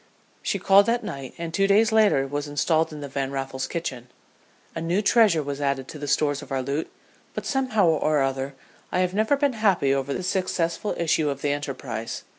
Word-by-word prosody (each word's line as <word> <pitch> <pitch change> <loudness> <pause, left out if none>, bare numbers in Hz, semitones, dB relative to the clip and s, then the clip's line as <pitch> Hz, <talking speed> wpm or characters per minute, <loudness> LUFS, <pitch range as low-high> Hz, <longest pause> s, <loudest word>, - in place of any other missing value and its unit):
She - - -1
called 195 +1 +5
that 235 +1 +1
night, 135 -2 -7
and 170 -1 -5
two 195 +2 +2
days 215 +3 +4
later 210 -11 +4
was 145 +2 -3
installed 160 +3 +1
in 150 -1 -8
the 145 - -5
Van 135 0 -3
Raffles's 135 -1 -3
kitchen. 130 -8 -5 0.7
A 165 - -4
new 170 +4 +1
treasure 205 -6 +4
was 140 0 -5
added 140 -2 -1
to 150 - -8
the 145 - -5
stores 145 0 +1
of - - -12
our 135 -1 -1
loot, 140 +4 -3 0.4
but - - -4
somehow 255 -7 +1
or 155 -2 +2
other 135 +1 -2 0.4
I 180 - +1
have 180 0 0
never 220 +7 +2
been 280 -2 +1
happy 195 - +2
over 135 0 -1
the 185 - -3
successful 185 +1 -1
issue 160 -2 +1
of 140 -1 -5
the 145 - +1
enterprise. 135 -6 -4
155 Hz, 205 wpm, -25 LUFS, 140-195 Hz, 0.7 s, called